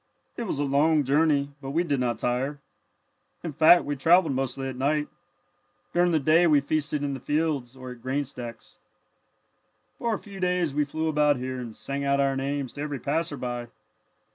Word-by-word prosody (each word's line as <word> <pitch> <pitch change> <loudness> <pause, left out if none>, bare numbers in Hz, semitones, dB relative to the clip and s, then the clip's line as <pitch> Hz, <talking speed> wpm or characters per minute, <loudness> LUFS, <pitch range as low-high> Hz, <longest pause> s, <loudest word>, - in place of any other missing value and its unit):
It 235 - -4
was 150 - -2
a 145 - 0
long 145 +2 +3
journey, 145 0 +2
but 135 - -6
we 170 - +3
did 145 -6 -1
not 120 -2 0
tire. 130 +5 -1 0.8
In 165 -3 -4
fact 160 +4 +6
we 145 - -2
travelled 165 +3 +4
mostly 135 0 -2
at 130 - -5
night. 150 +3 0 0.8
During 175 +1 +3
the 165 - +3
day 155 +4 +4
we 150 -3 +5
feasted 150 +1 -1
in 140 -1 -1
the 135 - -5
fields 145 -3 -1
or 130 -1 -8
at 120 -1 -11
grain 140 +3 -1
stacks. 120 -3 -9 1.2
"For 230 -2 0
a - - -3
few 200 -1 -11
days 180 -4 0
we 150 +1 +1
flew 160 +3 -3
about 150 -1 +3
here, 130 +1 -4
and 115 -3 -7
sang 140 0 -4
out 140 0 +2
our 135 -1 +2
names 135 -1 -3
to 145 - -7
every 145 -1 -3
passer 150 +3 -2
by. 120 -1 -4
145 Hz, 190 wpm, -26 LUFS, 135-155 Hz, 1.2 s, fact